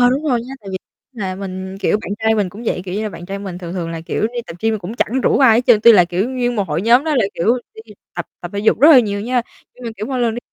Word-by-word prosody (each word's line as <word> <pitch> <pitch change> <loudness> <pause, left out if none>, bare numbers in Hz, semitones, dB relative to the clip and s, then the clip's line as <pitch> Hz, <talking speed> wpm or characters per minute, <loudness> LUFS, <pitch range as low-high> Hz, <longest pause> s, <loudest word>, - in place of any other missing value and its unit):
Ờ, 245 0 +5
đúng 275 +4 -1
rồi 245 -3 +1
nha, 260 +3 -8
tại 200 - -11
vì 190 - -3 0.3
là 195 -6 -4
mình, 190 0 -6
kiểu, 210 - +1
bạn - - -8
trai 220 0 +2
mình 205 -4 0
cũng 205 +6 -11
vậy, 180 - -2
kiểu 180 -1 -5
như 210 - -2
là, 215 - -2
bạn 175 -3 -10
trai 195 +1 -5
mình 190 -3 -7
thường 175 -2 -7
thường 175 -3 -4
là, 165 -1 -5
kiểu, 165 - -4
đi 240 +2 -1
tập 165 - -9
gym 225 -1 0
cũng 195 +3 -7
chẳng 245 +2 0
rủ - - +2
ai 245 -5 +6
hết - - +4
trơn. 225 -4 +5
Tuy 235 +1 +8
là, 185 -5 +6
kiểu, 180 +6 -2
nguyên 245 -2 -1
một 205 - +2
hội 170 - -1
nhóm 240 +6 +4
đó 315 -2 0
là, 240 - +3
kiểu, 230 +9 +1 0.2
đi 440 0 -13 0.2
tập - - -4
tập - - -7
thể - - -2
dục 215 +2 +2
rất 295 - +8
là 270 -5 +9
nhiều 205 -3 -2
nha, 245 +3 0 0.3
nhưng 250 - -13
mà, 230 - -3
kiểu, 210 - -5
mỗi 260 -2 -2
lần 230 -2 +1
đi - - -4
220 Hz, 330 wpm, -18 LUFS, 190-245 Hz, 0.3 s, là